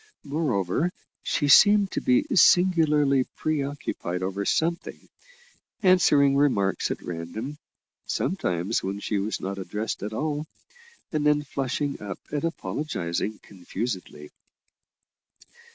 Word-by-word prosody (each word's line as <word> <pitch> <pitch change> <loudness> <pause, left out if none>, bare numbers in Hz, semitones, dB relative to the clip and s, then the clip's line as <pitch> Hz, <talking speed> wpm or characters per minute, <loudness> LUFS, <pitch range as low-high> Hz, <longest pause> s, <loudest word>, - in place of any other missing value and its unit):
Moreover, 145 - 0 0.3
she 145 - 0
seemed 205 +6 +6
to - - -2
be 265 +3 +3
singularly 155 - +4
pre 155 -2 -1
occupied 135 - -4
over 95 +2 -2
something, 170 +1 -1 0.7
answering 150 -7 +5
remarks 115 -9 +1
at - - -4
random 100 - -6 0.5
sometimes 100 - -1
when 95 +1 -4
she 105 0 -1
was 105 +3 -2
not 100 +1 -4
addressed 105 +4 -4
at 105 +2 -4
all 150 +6 -2 0.6
and 155 -2 -1
then 150 0 +3
flushing 140 +1 -3
up 100 -3 -5
and 145 +1 -2
apologising 110 - -3
confusedly. 95 -5 -6
140 Hz, 110 wpm, -25 LUFS, 100-155 Hz, 0.7 s, seemed